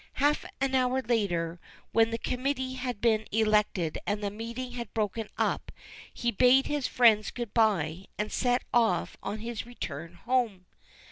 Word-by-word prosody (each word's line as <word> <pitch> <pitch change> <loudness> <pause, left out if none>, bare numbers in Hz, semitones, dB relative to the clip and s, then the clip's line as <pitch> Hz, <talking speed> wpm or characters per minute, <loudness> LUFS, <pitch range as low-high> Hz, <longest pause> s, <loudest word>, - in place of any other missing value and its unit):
Half 290 +3 +2
an 270 0 0
hour 260 0 +2
later, 175 -8 0 0.3
when 225 0 +4
the 230 - -2
committee 260 +2 -2
had 250 -4 -4
been 220 -2 +2
elected 210 -6 +2
and 205 0 -1
the 200 - -1
meeting 235 +4 -5
had 240 -2 -6
broken 215 0 -1
up, - - -1 0.4
he 240 - -1
bade 250 +5 +5
his 290 -3 -1
friends 220 -4 +4
good 240 -4 -6
bye 190 -6 +2
and 210 +1 -2
set 245 -1 +1
off 225 -8 +2
on 210 +2 -4
his 230 0 -5
return 165 -9 -6
home. 230 -8 0
225 Hz, 155 wpm, -29 LUFS, 205-250 Hz, 0.4 s, bade